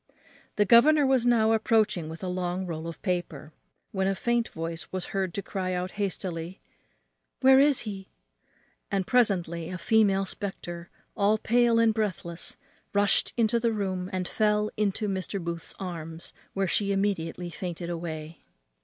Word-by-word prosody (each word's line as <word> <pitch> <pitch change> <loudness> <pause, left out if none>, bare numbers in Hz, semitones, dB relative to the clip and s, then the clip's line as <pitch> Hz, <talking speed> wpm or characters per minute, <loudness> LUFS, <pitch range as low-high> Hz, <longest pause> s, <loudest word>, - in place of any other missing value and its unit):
The 205 - +3
governor 285 +7 +6
was 260 -2 +3
now 225 -2 +4
approaching 220 -7 +2
with 165 +3 -8
a - - -2
long 180 0 -2
roll 165 -2 -5
of 165 - -7
paper, 175 -5 -3 0.4
when 190 -1 0
a 195 - +1
faint 235 +2 0
voice 165 +1 -6
was 185 -1 -4
heard 190 -2 0
to 200 - -3
cry 185 -1 -3
out 180 +1 -2
hastily, 185 -3 -4 0.8
"Where 265 0 +7
is 285 -1 +5
he?" 195 -3 -7 0.8
and 195 -2 0
presently 175 -9 +1
a 185 - -4
female 195 0 +3
spectre, 175 -3 -6 0.3
all 205 +1 +3
pale 235 +1 +3
and 230 -1 +4
breathless, 185 -6 -3 0.4
rushed 205 0 +3
into 235 0 +3
the 230 -1 +1
room, 190 -3 -2
and 185 -1 -2
fell 210 -1 +1
into 210 0 0
Mr. 195 0 -2
Booth's 170 -1 -5
arms, 165 -3 -7 0.2
where 195 0 +1
she 200 +3 +1
immediately 180 -3 -1
fainted 175 -1 -5
away. 165 -1 -6
190 Hz, 155 wpm, -27 LUFS, 175-215 Hz, 0.8 s, Where